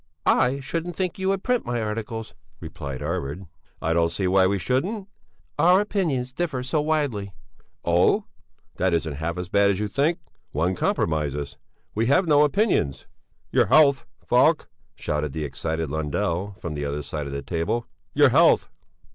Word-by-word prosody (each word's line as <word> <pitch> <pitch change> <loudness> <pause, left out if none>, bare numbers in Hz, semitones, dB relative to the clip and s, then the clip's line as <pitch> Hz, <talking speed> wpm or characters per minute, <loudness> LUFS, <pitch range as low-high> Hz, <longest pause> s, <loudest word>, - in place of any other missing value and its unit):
"I 130 +3 +3
shouldn't 165 +5 -3
think 185 -1 -2
you 190 - -1
would 195 0 0
print 250 -1 +1
my 120 0 -2
articles," 110 +1 -4 0.3
replied 70 -1 -7
Arvid. 85 +2 -3 0.4
"I 80 - +1
don't 85 0 +2
see 95 +3 -1
why 95 0 +4
we 100 +1 +1
shouldn't." 180 - -1 0.5
"Our 180 +3 +6
opinions 160 -12 -1
differ 145 -5 -2
so 145 +4 0
very 150 - -2
widely...." 130 -11 -1 0.5
"Oh! - - +3 0.5
That 95 -2 +2
isn't 80 -2 -1
half 85 +3 -3
as 90 0 -5
bad 100 0 +4
as 100 -1 0
you 105 - -1
think. 145 +10 +1 0.4
One 85 +6 +1
compromises. 75 -5 -1 0.4
We 115 +2 0
have 180 +8 +4
no 150 -2 +5
opinions." 150 - +1 0.5
"Your - - +3
health, 140 -3 +5 0.2
Falk!" - - +3 0.3
shouted 75 -2 -2
the 80 -1 -3
excited 80 +3 -3
Lundell, 85 +6 -2
from 85 - -5
the 75 -1 -4
other 75 +1 -3
side 70 +1 -5
of - - -6
the 70 0 -4
table. 90 +8 -2 0.3
"Your - - +6
health!" - - +4
100 Hz, 165 wpm, -24 LUFS, -, 0.5 s, Our